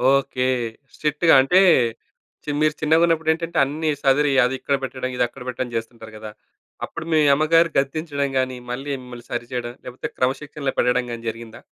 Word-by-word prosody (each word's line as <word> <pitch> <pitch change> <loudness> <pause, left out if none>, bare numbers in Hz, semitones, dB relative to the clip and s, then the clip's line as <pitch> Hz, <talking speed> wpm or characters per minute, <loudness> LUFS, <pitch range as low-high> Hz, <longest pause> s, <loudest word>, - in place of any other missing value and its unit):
Okay. 135 -2 -2 0.5
స్ట్రిక్ట్‌గా. 150 +2 +2
అంటే 155 +8 +4 0.8
ఛీ 150 - -3
మీరు 155 0 +3
చిన్నగా 160 +2 +4
ఉన్నప్పుడేంటంటే 165 0 0
అన్నీ 155 +3 -2
సదిరి 140 +2 +3
అది 125 +1 +1
ఇక్కడ 140 - 0
పెట్టడం, 130 -1 -4
ఇది 125 - +2
అక్కడ 120 - -15
పెట్టడం 125 0 -3
చేస్తుంటారు 115 -1 -6
గదా! 110 0 -8 0.5
అప్పుడు - - -8
మీ 155 - +4
అమ్మగారు 165 +3 +4
గద్దించడం 140 0 -1
గానీ, 130 -1 -1
మళ్ళీ 135 +4 -5
మిమ్మల్ని 120 -1 -11
సరిచేయడం 120 0 -4
లేకపోతే 125 +1 -6
క్రమశిక్షణలో 135 +2 -2
పెట్టడం 125 0 +2
గానీ 115 -1 -6
జరిగిందా? 115 0 -9
135 Hz, 155 wpm, -22 LUFS, 125-155 Hz, 0.8 s, అంటే